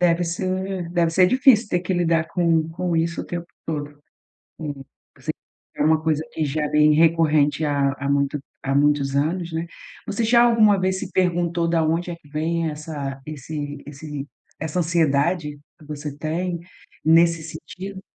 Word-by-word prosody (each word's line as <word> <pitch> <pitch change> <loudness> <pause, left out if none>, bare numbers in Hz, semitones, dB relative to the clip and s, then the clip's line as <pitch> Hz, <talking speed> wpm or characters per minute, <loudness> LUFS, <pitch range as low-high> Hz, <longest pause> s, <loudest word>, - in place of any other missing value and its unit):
Deve 175 0 +3
ser 185 +1 -2
deve 170 -2 +2
ser 180 +2 +5
difícil 250 -2 +4
ter 180 - +1
que 185 +1 -2
lidar 165 -2 +2
com 165 -2 +1
com 175 0 -2
isso 170 +1 0
o - - -7
tempo 175 -1 -5 0.2
todo. 145 -2 -4 0.6
Hum, 145 -3 -5 0.3
você - - -4 0.5
é - - +1
uma 155 0 +3
coisa 155 -1 +1
que 160 - -1
já 150 +1 -1
vem 150 0 +5
recorrente 155 -2 +3
há 140 -2 +1
há 140 0 -2
muito 140 +1 +1 0.2
há 135 0 0
muitos 140 -1 +2
anos, 165 +4 0
né? 165 +1 -2 0.4
Você 225 +3 -1
já 235 +1 +5
alguma 215 -4 +5
vez 185 0 0
se - - -6
perguntou 175 -2 +1
da 165 -1 +2
onde 165 +3 0
é 170 - -5
que 150 - -22
vem 165 +2 -1
essa 145 -3 -6
esse 145 0 -5
esse 145 -1 -7 0.3
essa 160 +3 -2
ansiedade 160 -2 +1 0.2
que 150 - -16
você 150 -1 -6
tem 170 +3 -2 0.4
nesse 165 0 +4
sentido? 185 +5 -8
160 Hz, 170 wpm, -23 LUFS, 150-175 Hz, 0.6 s, ser